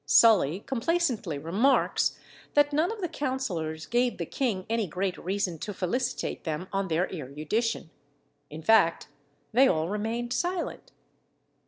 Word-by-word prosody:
Sully 185 0 +5
complacently 250 - 0
remarks, 200 - +2 0.4
that 290 0 +4
none 315 +7 +2
of 445 -2 -6
the 355 - 0
councillors 185 - -3
gave 245 0 +1
the 170 - -3
king 210 - -2
any 225 -2 0
great 180 +3 -2
reason 185 -3 -2
to 205 +4 -5
felicitate 245 +9 -2
them 160 +3 -3
on 195 0 0
their 170 +2 +1
erudition. 160 - -2 0.6
In 155 +2 -8
fact, 195 -5 +4 0.4
they 265 +4 +6
all 160 -4 +1
remained 225 +4 -2
silent. 355 +5 -2
205 Hz, 135 wpm, -28 LUFS, 165-255 Hz, 0.6 s, they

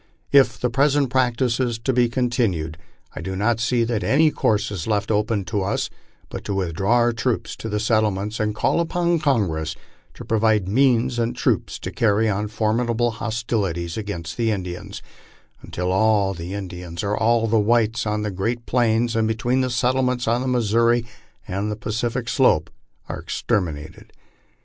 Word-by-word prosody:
If 130 -3 +5
the 125 - 0
present 140 +1 +2
practice 125 -1 +1
is 120 -3 0
to 120 +4 -1
be 120 -1 +3
continued, 115 - 0 0.4
I - - -5
do 95 +2 -4
not 110 +4 +1
see 120 +1 +1
that 115 -2 -1
any 155 +2 +4
course 105 -6 0
is 95 -6 -4
left 105 0 0
open 105 -1 0
to 105 +1 -1
us 95 - -1 0.4
but - - -7
to 100 - -2
with 90 -4 -1
draw 100 +8 +1
our 120 0 +3
troops 115 0 -2
to 110 - -6
the 105 0 -1
settlements 105 -1 0
and 105 -1 -1
call - - +1
upon 170 0 +1
Congress 90 - 0 0.4
to - - -9
provide 110 -3 +2
means 125 +2 +2
and 115 0 -1
troops - - 0
to - - -6
carry 110 0 +2
on 105 0 -1
formidable 115 +2 0
hostilities 110 -7 -2
against 95 -7 -5
the 115 -1 +1
Indians, 90 -4 -5 0.6
until 90 +1 -3
all 100 0 +3
the 90 +2 -6
Indians 90 -3 -6
or 100 +1 0
all 115 +1 +2
the 115 0 +2
whites 115 +1 +2
on 105 0 -1
the 105 - -2
great 115 +6 -2
plains, 115 -1 +1
and 110 -1 +2
between 120 +4 0
the 130 - 0
settlements 125 +1 0
on 120 +2 +2
the 130 - -2
Missouri 115 -1 +2 0.4
and 100 +3 -2
the 105 - -2
Pacific 115 +2 -3
slope, 85 - +2 0.4
are - - -5
exterminated. 80 -6 -3
110 Hz, 175 wpm, -22 LUFS, 100-120 Hz, 0.6 s, If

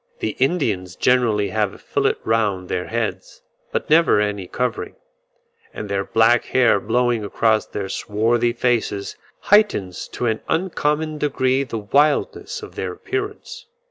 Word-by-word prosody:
The - - -3
Indians 115 - 0
generally 115 -5 +2
have 105 0 -1
a - - -12
fillet - - 0
round 105 -5 0
their 90 -1 -2
heads, 115 -1 -4 0.3
but - - -2
never 160 -7 +4
any 105 -3 -2
covering; 125 +2 -3 0.8
and 105 - -6
their 100 0 0
black 115 +4 +3
hair 125 -5 +3
blowing 120 +1 +1
across 110 +2 +1
their 100 - -4
swarthy 115 +4 0
faces, 120 -5 -1 0.4
heightens 195 - +3
to - - -3
an 110 -2 0
uncommon 155 -3 -1
degree 135 -2 +1
the 120 -4 -5
wildness 145 - 0
of 420 - -9
their - - -4
appearance. 425 +5 -5
120 Hz, 140 wpm, -21 LUFS, 105-145 Hz, 0.8 s, never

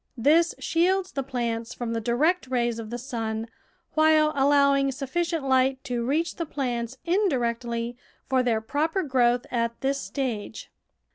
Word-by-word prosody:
This 315 +8 +3
shields 370 +3 +1
the 275 - -2
plants 235 -3 -3
from 235 -2 -3
the 230 - -2
direct 285 +9 +1
rays 240 -2 0
of 220 -1 -6
the 240 - -4
sun, 225 -3 -3 0.5
while 310 -1 +4
allowing 280 0 +4
sufficient 295 +3 -2
light 260 0 +2
to 245 -4 -2
reach 305 +7 -1
the 335 - -2
plants 245 -3 -3
indirectly 240 - 0 0.3
for 260 -1 +2
their 230 -3 +1
proper 310 - -1
growth 250 -4 +2
at 235 -1 -1
this 275 +1 0
stage. 235 -6 -4
260 Hz, 145 wpm, -26 LUFS, 235-305 Hz, 0.5 s, while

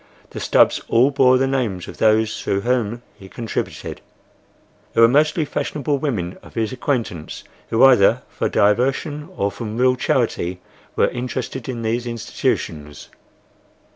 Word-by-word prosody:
The - - -6
stubs - - +3
all 125 +5 +4
bore 130 -2 +4
the 135 - +2
names 120 -10 -2
of - - -10
those 110 0 +2
through 100 - -1
whom 120 0 -1
he 95 - -14
contributed—they 115 0 -8
were 115 - +8
mostly 150 +5 +2
fashionable 145 -1 -2
women 105 - -3
of - - -16
his 110 -2 -1
acquaintance, 120 - -3 0.3
who 115 +3 +3
either 125 -7 +5
for - - -3
diversion 135 - +1
or 100 0 0
from 105 +2 -6
real 130 +1 +3
charity 120 - -1 0.4
were - - +3
interested 125 0 -5
in 120 -3 -4
these 120 +2 -1
institutions. 75 -9 -3
120 Hz, 140 wpm, -20 LUFS, 105-135 Hz, 0.4 s, were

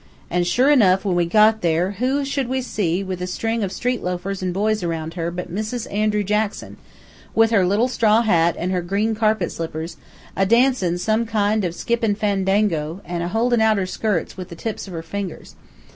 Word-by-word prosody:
An' 175 0 +1
sure 255 +10 +3
enough, 195 -8 +4
when 185 -3 +1
we 175 -1 +2
got 215 +3 +4
there, 170 +2 +1
who 270 +3 +1
should 275 -2 -2
we 260 +1 -1
see, 195 -6 -1
with 185 -2 -5
a 180 - -3 0.2
ring 225 0 0
of 190 - -2
street 245 +5 -2
loafers 180 +2 -3
an' 185 -1 -1
boys 210 +3 0
around 165 -2 -3
her, 170 -1 -2
but 175 0 -6
Mrs. 215 +3 -3
Andrew 210 0 +1
Jackson, 210 +1 -2 0.6
with 225 0 +4
her 200 -4 +4
little 205 +7 +2
straw 230 -2 +3
hat 170 -6 +3
an' 180 +2 -2
her 180 -1 0
green 200 +5 0
carpet 220 0 +1
slippers, 165 0 -5 0.4
a 195 - +2
dancin' 230 -4 +3
some 220 +5 0
kind 215 -1 +1
of 180 - 0
a - - -9
skippin' 230 -3 0
fandango, 195 -5 0
an' 175 0 -3
a 170 - -2
holdin' 230 +4 +1
out 220 -1 +4
her 190 - 0
skirts 190 -1 -2
with 185 -2 -8
the 170 - -8
tips 215 +4 -5
of 185 - -9
her 165 -1 -5
fingers. 190 +1 -6
200 Hz, 205 wpm, -21 LUFS, 180-220 Hz, 0.6 s, enough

